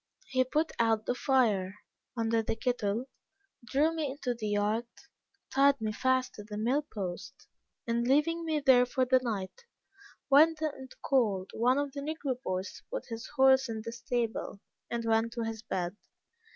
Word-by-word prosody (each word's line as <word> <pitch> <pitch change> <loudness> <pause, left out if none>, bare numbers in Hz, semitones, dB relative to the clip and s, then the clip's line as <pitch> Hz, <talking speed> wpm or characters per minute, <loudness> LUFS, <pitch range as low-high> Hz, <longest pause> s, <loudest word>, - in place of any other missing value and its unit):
He 255 -1 +3
put 305 +5 0
out 225 -2 +2
the - - +1
fire 220 -8 +1 0.4
under 225 0 +1
the 220 - -2
kettle, 225 -1 -1 0.6
drew 290 +6 +1
me 315 -3 -2
into 265 -2 -3
the 225 -3 -5
yard, 210 +3 0 0.6
tied 275 0 +4
me 215 -1 -2
fast 260 +3 +1
to 210 - -9
the 210 0 -7
mill 245 +7 +1
post, 185 -4 -6 0.4
and 235 0 0
leaving 330 +5 +2
me 315 -2 -1
there 250 -2 +5
for 260 0 +1
the 255 +1 +4
night, 225 - -4 0.6
went 310 +3 +6
and 280 -4 -4
called 210 -8 +1
one 250 +4 +2
of 285 -1 -1
the 280 0 -6
negro 280 -4 -3
boys 185 -5 -3
to - - -16
put - - -4
his 230 -1 -6
horse 265 -1 +5
in 220 -1 -4
the 230 - -4
stable, 235 -3 -3 0.3
and 235 -1 -3
went 225 +1 +1
to 235 -1 -3
his 225 -1 -4
bed. 180 -3 -3
245 Hz, 170 wpm, -30 LUFS, 220-270 Hz, 0.6 s, went